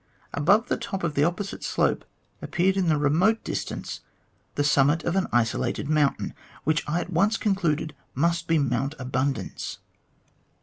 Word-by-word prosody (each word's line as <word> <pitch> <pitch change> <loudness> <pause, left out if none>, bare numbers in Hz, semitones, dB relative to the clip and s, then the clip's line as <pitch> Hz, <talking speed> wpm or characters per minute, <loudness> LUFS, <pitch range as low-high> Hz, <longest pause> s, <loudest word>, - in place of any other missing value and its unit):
Above 200 +11 +3
the - - 0
top 195 -5 -4
of 165 -3 0
the 145 - +2
opposite 180 +5 -2
slope - - +1 0.4
appeared 190 +2 +1
in 190 -3 +1
the 155 -2 +3
remote 170 +10 +2
distance - - -4 0.6
the 145 - +1
summit 145 +2 +3
of 170 - -1
an 190 - +1
isolated 120 +4 0
mountain, 150 -2 +1 0.3
which 155 +2 +1
I 170 +3 +1
at 180 - -7
once 205 +7 +3
concluded 165 -7 0 0.2
must 170 +5 +1
be 165 - +3
Mount 135 +1 0
Abundance. 130 +1 -2
160 Hz, 155 wpm, -26 LUFS, 145-190 Hz, 0.6 s, Above